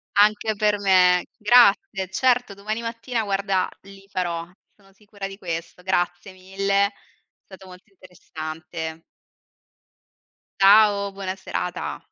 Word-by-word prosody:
Anche 210 +1 +3
per 210 0 +1
me. 180 -2 +4
Grazie. 205 -4 +4
Certo, 245 0 +1
domani 215 +3 -4
mattina, 230 0 -3
guarda, 195 -2 0
li 195 0 -16
farò. 170 -3 -3 0.3
Sono 195 -2 -24
sicura 205 -1 -9
di 195 0 -10
questo. 170 -1 -6
Grazie 180 0 -2
mille. 195 +2 0
È - - -12 0.5
stato 190 -1 -14
molto 185 +4 -15
interessante. 160 -3 -8 1.6
Ciao, 200 0 +5
buona 195 -1 -5
serata! 180 -1 -4
195 Hz, 115 wpm, -23 LUFS, 180-205 Hz, 1.6 s, Ciao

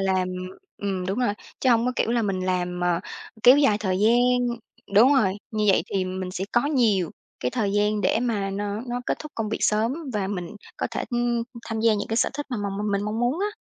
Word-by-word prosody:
làm 190 -1 +1 0.5
ừm, 190 -2 -2
đúng 195 +5 -2
rồi, 240 -5 +2 0.3
chứ 260 - +3
hông 235 0 +3
có 250 - +1
kiểu 230 - +1
là 235 -1 +2
mình 195 -3 -1
làm 180 -1 -1
mà 175 -1 +1 0.4
kéo 250 +4 +8
dài 220 -8 +4
thời 190 -2 0
gian 245 +2 +3 0.4
đúng 250 +8 +7
rồi, 200 -8 +3 0.2
như 215 -2 -1
vậy 195 - +4
thì 190 -2 +1
mình 185 0 -4
sẽ 185 +1 -3
có 240 +3 +3
nhiều 220 - +2 0.3
cái 125 - -1
thời 200 - -1
gian 210 +1 +1
để 220 - +2
mà 210 -5 -1
nó 205 +1 -3
nó 245 +1 -2
kết - - -1
thúc 305 -1 -9
công 220 -2 -2
việc 220 - -2
sớm 220 +4 +2 0.2
và 200 -2 -1
mình 190 0 -5 0.2
có - - -1
thể, - - -3
ưm, 240 -1 0 0.2
tham 225 -1 -3
gia 225 -1 +4
những 205 - -3
cái 225 - -1
sở - - +2
thích 290 0 -4
mà 245 - -1
mà 205 -1 -2
m 205 +1 -2
mình 200 - 0
mong 215 +2 -2
muốn 250 +7 +1
á. 415 +1 -2
210 Hz, 240 wpm, -25 LUFS, 195-240 Hz, 0.5 s, kéo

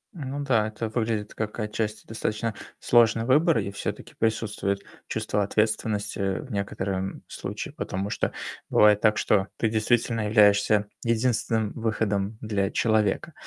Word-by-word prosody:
Ну 145 -2 -4
да, 115 -6 +2
это 110 +1 -4
выглядит 110 -2 -2
как 110 +1 -4
отчасти 105 0 -3
достаточно 110 0 -2 0.3
сложный 115 -1 +4
выбор. 150 +6 +4
И 100 - -1
всё-таки 100 - -5
присутствует 105 -3 -1 0.2
чувство 105 - -1
ответствености 105 0 0 0.2
в 140 -4 -9
некотором 95 -2 -3
случае, - - -6
потому 95 +2 -3
что - - -1 0.4
бывает 105 -1 +5
так, 110 -1 +4
что 100 -2 +2
ты 115 - +1
действительно 115 0 +1
являешься 105 -1 +4 0.2
единственным 115 -2 +1
выходом 110 -2 -1
для 100 -3 0
человека. 110 - +1
110 Hz, 130 wpm, -26 LUFS, 105-115 Hz, 0.4 s, бывает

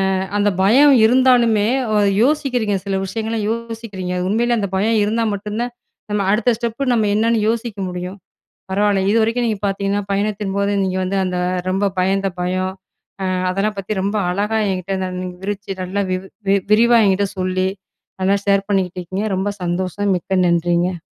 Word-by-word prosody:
அ - - 0 0.2
அந்த 205 0 +3
பயம் 270 +9 +6
இருந்தாலுமே, 240 -3 +4 0.3
வ - - +3 0.3
யோசிக்கிறீங்க. 255 -7 +1
சில 195 -1 -1
விஷயங்கள 225 +3 -3
யோசிக்கிறீங்க. 225 -5 -4
உண்மையிலே 235 +3 +1
அந்த 200 -2 -2
பயம் 220 +3 +2
இருந்தா 225 +2 0
மட்டும் 210 +2 -5
தான், 245 0 -5 0.4
நம்ம 210 -1 +1
அடுத்த 235 +2 +2
ஸ்டெப்பு 240 +3 -1
நம்ம 220 -3 +2
என்னன்னு 225 +1 +2
யோசிக்க 225 -2 -3
முடியும். 180 +2 -6 0.5
பரவால்ல, 200 0 +2
இது 215 - +2
வரைக்கும் 230 +2 +1
நீங்க 215 -3 -2
பார்த்தீங்கன்னா, 200 +1 -1
பயணத்தின்போது 200 0 -1
நீங்க 185 -1 -1
வந்து 190 +2 -2
அந்த 180 -1 -2 0.3
ரொம்ப 195 +2 +1
பயந்த 195 +1 +1
பயம். 185 +1 -1 0.5
அ - - -1 0.2
அதெல்லாம் 200 +3 -1
பத்தி 195 +2 -4
ரொம்ப 200 +2 -1
அழகா 205 +4 0
என்கிட்ட 185 +1 -3
ந - - -2
நீங்க 180 -1 -6
விவரிச்சு 200 0 -4
நல்லா 190 +2 -2
வி 185 - +1 0.3
வி 195 - +5 0.2
விரிவா 235 +2 +5
என்கிட்ட 195 +1 +2
சொல்லி, 185 0 0 0.5
நல்லா 195 +2 +3
ஷேர் 200 -1 +2
பண்ணிக்கிட்டுருக்கீங்க. 185 0 -1
ரொம்ப 190 +2 -1 0.2
சந்தோஷம். 185 +3 -1
மிக்க 190 +2 -3
நன்றிங்க. 175 +1 +1
200 Hz, 160 wpm, -19 LUFS, 190-225 Hz, 0.5 s, பயம்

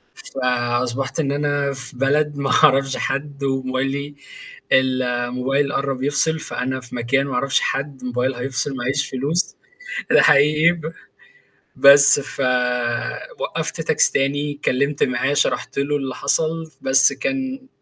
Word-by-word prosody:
فأصبحت 125 - -2
إن 140 -3 0
أنا 145 -1 -1
في 130 -1 -7
بلد 145 +2 +1
ما 140 -1 -1
أعرفش 135 0 +3
حد، 140 +1 -4
وموبايلي 135 +2 -2 0.6
الموبايل 130 +1 0
قرّب 135 -1 -2
يفصل، 160 +3 +1
فأنا 130 -3 -3
في 125 0 -10
مكان 125 +3 0
ما 135 - -5
أعرفش 135 +2 +1
حد 135 0 -3
الموبايل 125 +1 -1
هيفصل 135 +2 -3
ما 120 - -5
عيش 140 +3 -1
فلوس، 145 +7 -2 0.6
آآ - - +6
حقيقي 150 +4 +5
ب 165 -2 -7 0.8
بس 140 +1 +7
فوقّفت 125 - -2
تاكسي - - +2
تاني 145 +2 0
اتكلّمت 140 0 0
معاه، 130 +2 0
شرحت 145 - -1
له 145 +1 0
اللي 135 -2 -5
حصل، 160 0 -1
بس 130 -1 +4
كان 265 -1 -4
135 Hz, 130 wpm, -20 LUFS, 130-145 Hz, 0.8 s, بس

